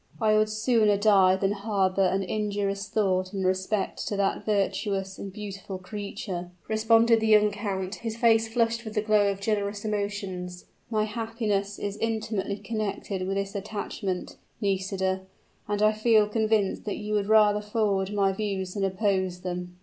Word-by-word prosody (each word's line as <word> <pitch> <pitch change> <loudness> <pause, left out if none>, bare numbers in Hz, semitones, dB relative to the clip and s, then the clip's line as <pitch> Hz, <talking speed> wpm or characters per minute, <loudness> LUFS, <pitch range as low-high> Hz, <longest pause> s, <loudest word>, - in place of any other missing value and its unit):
"I 215 -2 +3
would 215 0 +3
sooner 215 -1 +3
die 195 -3 +5
than 195 +1 0
harbor 200 -2 0
an 190 +1 +2
injurious 200 0 -2
thought 185 -2 0
in 190 - -1
respect 190 +2 -1
to 205 - -2
that 200 -1 0
virtuous 195 -1 -1
and 195 - -6
beautiful 200 -1 -7
creature!" 185 -2 -6 0.2
responded 225 +1 +4
the 220 - 0
young 210 -1 +5
count, 200 -2 -3
his 225 -1 -5
face 225 -1 +4
flushed 230 0 0
with 220 -1 -7
the 210 - +1
glow 210 -2 +3
of 195 -1 -3
generous 205 0 -1
emotions. 200 -4 -3 0.2
"My 215 -2 +1
happiness 215 -2 -2
is 205 0 -4
intimately 215 -3 -2
connected 205 -3 -3
with 195 +1 -1
this 200 0 -2
attachment, 200 -2 -4 0.2
Nisida, 190 -2 -1 0.5
and 205 0 0
I 215 - +6
feel 215 -1 +3
convinced 215 -2 0
that 205 - -3
you 210 0 -4
would 205 -1 +1
rather 210 -1 +5
forward 205 -2 0
my 200 -2 +2
views 190 -2 -3
than 200 - -2
oppose 190 -2 0
them." 180 0 -5
205 Hz, 160 wpm, -27 LUFS, 195-215 Hz, 0.5 s, I